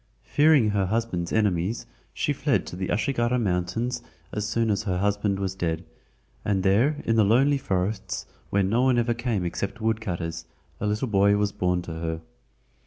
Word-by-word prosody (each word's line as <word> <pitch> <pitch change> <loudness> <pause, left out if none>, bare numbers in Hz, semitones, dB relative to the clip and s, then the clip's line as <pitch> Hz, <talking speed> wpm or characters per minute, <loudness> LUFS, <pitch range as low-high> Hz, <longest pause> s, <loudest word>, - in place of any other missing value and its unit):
Fearing 145 -7 +4
her 100 -2 +1
husband's 100 -5 -1
enemies, 105 -1 +1 0.3
she - - -1
fled - - +1
to - - -7
the 95 0 -3
Ashigara 120 +2 +1
Mountains 110 +4 -1 0.3
as 105 0 -2
soon 115 0 +1
as 100 - 0
her 95 -5 -1
husband 100 +1 +1
was 95 -1 -1
dead, 85 -2 -2 0.6
and 95 -2 0
there 115 +11 +2
in 115 - +2
the 110 - +6
lonely 135 +7 +4
forests 95 -1 -2 0.2
where 100 0 +2
no 110 +6 +2
one 130 -1 +3
ever 120 0 +2
came 115 -6 -1
except 100 +4 -3
woodcutters, 90 -8 -2 0.3
a 105 - -1
little 105 +5 0
boy 100 -1 +4
was 105 -1 +1
born 90 -2 0
to 85 - -6
her. 80 0 -3
105 Hz, 175 wpm, -26 LUFS, 90-115 Hz, 0.6 s, the